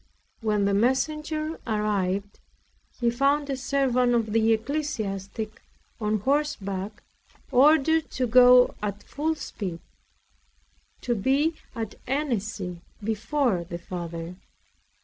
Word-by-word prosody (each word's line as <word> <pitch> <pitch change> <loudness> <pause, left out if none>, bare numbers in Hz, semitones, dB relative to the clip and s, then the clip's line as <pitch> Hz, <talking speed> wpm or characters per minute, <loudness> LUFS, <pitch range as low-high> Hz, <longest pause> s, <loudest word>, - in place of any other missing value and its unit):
When 210 -3 +1
the 200 - +2
messenger 305 +7 0
arrived, 205 -2 -1 0.6
he 240 -2 +2
found 280 +3 +1
a - - 0
servant 255 -2 +2
of 220 -3 0
the 225 0 +3
ecclesiastic 220 -5 -3 0.4
on 215 -2 0
horseback, 210 -8 -1 0.5
ordered 305 +4 +4
to 255 - -1
go 250 +1 +7
at 205 -1 -4
full 315 +2 -2
speed, 190 - -5 1.2
to 245 - 0
be 270 +9 +2 0.2
at 225 -3 -4
Annecy 215 - -2 0.2
before 225 -1 0
the 170 0 -6
Father. 170 0 -6
230 Hz, 105 wpm, -26 LUFS, 200-275 Hz, 1.2 s, go